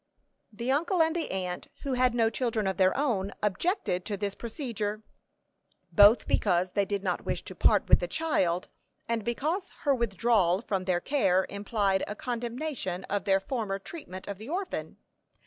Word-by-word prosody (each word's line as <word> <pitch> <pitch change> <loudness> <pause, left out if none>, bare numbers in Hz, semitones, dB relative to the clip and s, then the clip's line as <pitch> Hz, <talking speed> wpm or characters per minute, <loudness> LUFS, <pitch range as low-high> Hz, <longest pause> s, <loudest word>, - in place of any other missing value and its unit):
The 235 +4 -2
uncle 335 +6 +1
and 320 +1 0
the 335 - -2
aunt, 180 -2 -3 0.2
who 275 -2 -1
had 250 -1 +2
no 225 -2 +3
children 225 -3 -1
of 190 -1 -1
their 185 +3 +3
own, 220 -9 0
objected 210 - 0
to 205 -2 -3
this 200 0 -2
procedure, 220 -3 -4 0.9
both 210 +3 +6
because 180 +1 +2
they 200 0 +1
did 200 0 -2
not 180 -3 -1
wish - - -3
to - - -7
part - - +3
with - - +6
the - - -2
child, 190 - 0 0.4
and 230 -2 -1
because 310 - -1
her 285 - +3
withdrawal 215 -4 +2
from 190 -5 -2
their 180 -2 +1
care 190 -10 +2
implied 200 -1 0
a 210 - -5
condemnation 240 - -3
of 205 0 -1
their 195 -1 +4
former 205 -2 -2
treatment 195 - -9
of 200 -1 -5
the 220 +5 -9
orphan. 370 +3 -4
215 Hz, 170 wpm, -29 LUFS, 190-255 Hz, 0.9 s, both